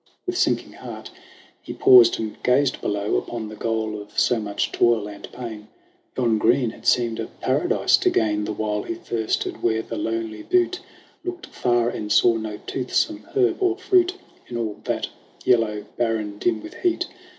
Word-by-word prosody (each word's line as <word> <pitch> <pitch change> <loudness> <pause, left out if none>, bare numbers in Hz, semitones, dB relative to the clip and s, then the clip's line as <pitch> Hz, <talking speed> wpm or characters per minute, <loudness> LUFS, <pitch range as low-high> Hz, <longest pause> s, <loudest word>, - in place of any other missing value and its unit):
With 360 -1 -2
sinking 375 - +1
heart - - -9 0.5
he - - -7
paused 120 -2 +7
and 110 -1 -4
gazed 130 +2 +2
below 105 0 0
Upon 115 -3 -4
the 110 - -8
goal 110 -1 -2
of 105 - -14
so 120 - +3
much 105 -1 -2
toil 115 -3 +2
and 100 -1 -10
pain. 110 -4 -7 0.5
Yon 115 -4 +2
green 120 +1 +3
had - - -10
seemed 115 -2 +2
a - - -3
paradise - - +2
to - - +2
gain 105 -1 +1
The - - -3
while 105 0 -2
he 170 - -4
thirsted 115 -9 -2
where 110 -1 +1
the - - -6
lonely 115 -1 -3
butte 365 0 +1 0.4
Looked 360 0 -5
far 120 -1 +1
and 105 -3 -5
saw 115 +3 +5
no 110 -1 -5
toothsome 295 - -1
herb 390 0 +2
or 370 -1 +2
fruit 370 -1 +3 0.3
In 120 - -5
all 110 -3 -3
that - - -1 0.4
yellow 110 -4 +2
barren 110 -3 -1
dim 180 - 0
with 325 +2 -9
heat. 355 -1 +1
115 Hz, 175 wpm, -23 LUFS, 110-135 Hz, 0.5 s, paused